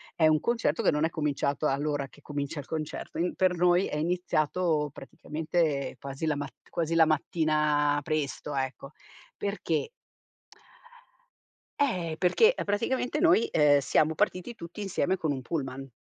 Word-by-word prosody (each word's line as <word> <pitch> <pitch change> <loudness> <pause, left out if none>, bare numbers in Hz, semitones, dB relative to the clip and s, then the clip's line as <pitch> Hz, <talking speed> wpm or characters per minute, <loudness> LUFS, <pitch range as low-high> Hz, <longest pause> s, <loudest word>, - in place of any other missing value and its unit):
è 160 - +3
un 155 -1 +4
concerto 230 -10 0
che - - +3
non 150 +1 0
è 160 - +2
cominciato 150 -1 -1
all'ora 145 0 -1
che 145 - -20
comincia 145 +1 -4
il - - -15
concerto. 155 -2 -5
Ehm, 180 - 0
per 185 -1 +2
noi 175 +2 +3
è 150 - -3
iniziato 160 -2 0
praticamente 150 0 -2
quasi 140 +3 -5
la 150 -2 +1
mat 140 -4 -5 0.2
quasi 165 0 -1
la 165 -1 +7
mattina 150 -1 +1
presto, 150 -1 -3
ecco, 135 +1 -3 0.5
perché 200 - -2 1.9
eh, 180 - 0
perché 440 - +4
praticamente 245 +7 -1
noi, 330 -9 +4
ehm, 145 -2 +5
siamo 155 +3 +2
partiti 185 +10 -1
tutti 170 +4 -9
insieme 190 -1 0
con 155 -4 -1
un 130 - -5
pullman 135 -2 -4
155 Hz, 145 wpm, -28 LUFS, 145-180 Hz, 1.9 s, la